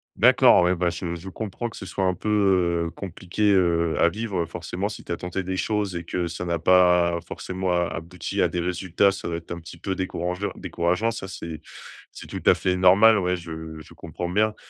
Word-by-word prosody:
D'accord - - +6
ouais, 90 +1 +3
bah, 90 0 +1
je 85 0 -4
je 90 +3 -8
comprends 110 +4 -5
que - - -12
ce - - -7
soit 95 +1 -2
un 90 0 +1
peu, 95 -5 +1
heu, - - -4
compliqué, 100 +2 -1
heu, 85 -3 +2
à 85 - +6
vivre 100 -3 -3
forcément 90 +4 -4
si 105 - -9
tu - - -8
as 85 - -1
tenté 90 +1 -4
des 95 +1 -3
choses 105 -2 -1
et 85 - -4
que 90 +1 -2
ça 85 +1 -5
n'a 85 -1 -1
pas 90 0 +4
forcément 95 0 -3
a 90 0 +2
abouti 85 +2 -4
à - - +4
des 90 - -3
résultats, 90 +2 +1
ça 95 - -6
doit 85 -1 -2
être 85 - -11
un 85 - -4
petit 85 +1 -11
peu 95 +3 -3
décourangeu 90 +1 -3
décourageant. 90 +7 -1
Ça 100 -3 -6
c'est 80 -3 -7 0.5
c'est - - -10
tout - - -7
à - - +7
fait 90 -1 0
normal, 100 +4 +6
ouais 90 -1 0
je 80 -2 -8
je 80 - -13
comprends 85 +2 -6
bien 105 +4 +1
90 Hz, 220 wpm, -24 LUFS, 85-95 Hz, 0.5 s, à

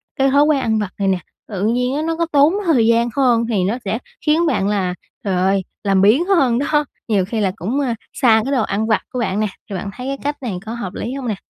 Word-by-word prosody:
cái 270 0 +2
thói 285 +1 +5
quen 295 -3 +2
ăn 220 -2 +1
vặt 205 -3 -3
này 195 - +1
nè, 190 -1 +2 0.3
tự 200 -3 -4
nhiên 250 +4 +1
á 300 - -1
nó 330 - 0
có 335 +1 0
tốn 290 +3 +5
thời 255 -10 +3
gian 235 +1 +3
hơn, 245 -4 +3
thì 200 -5 +1
nó 205 +6 0
sẽ 220 +4 -1 0.3
khiến 315 +3 +3
bạn 220 -9 +1
là, 190 -3 0 0.3
trời 195 -4 -1
ơi, 190 +1 +2 0.2
làm 195 -2 +2
biếng 225 - +4
hơn 275 -11 +3
đó! 295 +1 +1 0.2
Nhiều 200 -5 +2
khi 220 +3 -3
là 195 -2 +1
cũng, 225 +8 -2
ờ, 260 -5 0 0.2
xa 225 -3 +4
cái 270 - -3
đồ 255 -5 +2
ăn 215 +2 -1
vặt 220 - +2
của 250 - -2
bạn 210 -4 -1
nè, 215 - +1 0.2
thì 200 - -4
bạn 190 +2 -4
thấy 250 +1 -7
cái 275 0 -2
cách 290 +1 -2
này 205 -7 -3
có 225 - -5
hợp 200 -6 -5
lý 240 - -4
hông 270 -3 -5
nè? 215 - -1
230 Hz, 270 wpm, -19 LUFS, 200-275 Hz, 0.3 s, thói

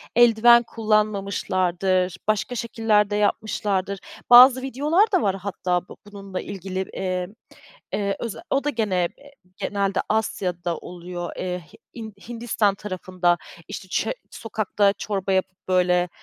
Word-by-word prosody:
eldiven 235 0 +6
kullanmamışlardır, 195 -4 0
başka 215 +3 0
şekiller 220 -3 +1
de 205 - -1
yapmışlardır. 200 -2 0 0.3
Bazı 250 +1 +9
videolar 300 - +2
da 370 -4 +3
var 195 -2 +1
hatta 180 -2 -2
bu - - -11
bununla 200 -2 -7
ilgili. 190 -1 -5
Eee, 185 -1 -2 0.7
eee, 200 -1 0
öze 230 -3 -5
o 275 - +1
da 295 - 0
gene 205 -9 0
eee, 285 0 -17 0.3
genelde 200 -1 -1
Asya'da 180 -6 -1
oluyor, 175 0 -7
Eee, 180 -1 -3
Hi - - -15 0.2
Hin 220 -3 -7 0.2
Hindistan 230 -4 0
tarafında 185 -3 -1 0.3
işte 190 - -7
çö - - -1 0.2
sokakta 210 -2 0
çorba 200 -1 -3
yapıp 190 -1 -2
böyle, 180 -1 +2
200 Hz, 130 wpm, -23 LUFS, 185-225 Hz, 0.7 s, Bazı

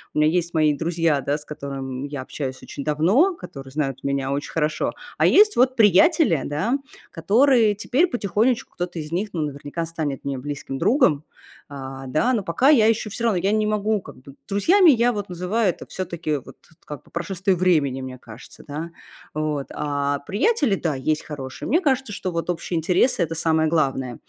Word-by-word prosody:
У - - -2
меня 150 +1 +4
есть 175 -1 -1
мои 155 -2 +4
друзья, 165 -2 0
да, 145 +3 -1
с 150 - -13
которыми 135 -2 -6
я 140 -2 -5
общаюсь 130 -1 -6
очень 140 - -7
давно, 190 - +3
которые 135 - -10
знают 135 -2 -3
меня 140 -1 -1
очень 140 +1 -3
хорошо. 155 -1 0 0.3
А - - +5
есть 420 0 +5
вот 255 +1 +3
приятели, 225 - +4
да, 190 - -1 0.3
которые 220 - +3
теперь 260 - +1
потихонечку 230 - 0
кто-то 175 -1 -5
из 155 0 -6
них, 195 +5 -1
ну, 165 - -2
наверняка 145 +3 -4
станет 155 -4 -4
мне 140 -2 -3
близким 145 0 -5
другом. 190 - +3 0.4
А, 135 -1 -8
да, 155 - +1
но 225 - +1
пока 185 +11 +2
я 230 -8 +6
еще 225 -1 +1
всё 235 - -3
равно, 225 -5 +2
я 195 +3 +1
не 215 0 +2
могу 215 0 0
как - - -12
бы. 140 +1 -14
Друзьями 335 - +5
я 245 -1 +3
вот 205 -3 -4
называю- 185 +5 -1
это 175 - -5
всё-таки 170 -5 -3
вот 130 - -12 0.3
как, 150 -3 -8
по - - -23
прошествии 185 +3 -2
времени, 155 -7 +2
мне 130 -1 -7
кажется, 115 -2 -13
да, 155 +3 -6 0.4
вот. 150 -2 -2
А 145 -1 -1
приятели- 215 - +1
да, 160 -5 -2
есть 155 +4 -1
хорошие. 135 -3 -7
Мне 330 +7 +2
кажется, 265 - 0
что 185 -1 -4
вот 170 +1 -3
общие 175 0 -2
интересы- 175 +5 +2
это 165 0 -3
самое 160 -1 +2
главное. 135 -6 0
165 Hz, 190 wpm, -23 LUFS, 145-215 Hz, 0.4 s, я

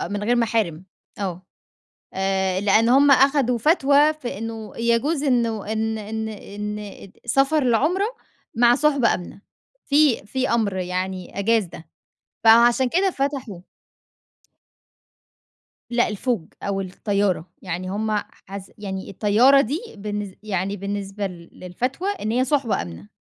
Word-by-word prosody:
آه - - -3
من 205 +2 -4
غير 240 +3 +2
محارم، 215 -8 0 0.3
آه، 185 -3 -4 0.7
آآ 190 -1 0
لأن 210 +3 +3
هم 275 +3 +5
أخدوا 270 -2 +4
فتوى 295 +1 +4
في 245 -9 -6
إنه 225 -1 -6
يجوز 235 +6 +1
إنّه 230 -6 0
إن 220 0 -1
إن 220 +1 -4
إن 210 -1 -7
سفر 275 +5 +2
العُمرة 305 - +2 0.5
مع 240 +1 +5
صُحبة 280 -4 +2
آمنة، 180 +2 -8 0.5
في 285 -7 +3
في 260 +4 -1
أمر 220 -5 +1
يعني 185 0 -4
أجاز 225 +1 +2
ده. 170 -2 -12 0.6
فعشان 235 +3 +6
كده 380 +7 +2
فتحوا. 270 - -3 2.3
لأ، 240 0 +2
الفوج 210 -4 -2 0.2
أو 195 -1 -2
الطيارة، 195 -1 -1 0.2
يعني 180 0 -4
هم 215 +3 -2 0.4
حاس 195 0 -9
يعني 190 -2 -6
الطيارة 225 +8 +4
دي، 280 +5 -1 0.2
بالنسب 205 -1 -5
يعني 195 -1 -2
بالنسبة 200 0 -4
ل 175 -3 -10
للفتوى 250 - -4
إن 370 - -3
هي 250 +2 +2
صُحبة 265 - 0
آمنة، 85 +3 -10
220 Hz, 130 wpm, -22 LUFS, 195-255 Hz, 2.3 s, فعشان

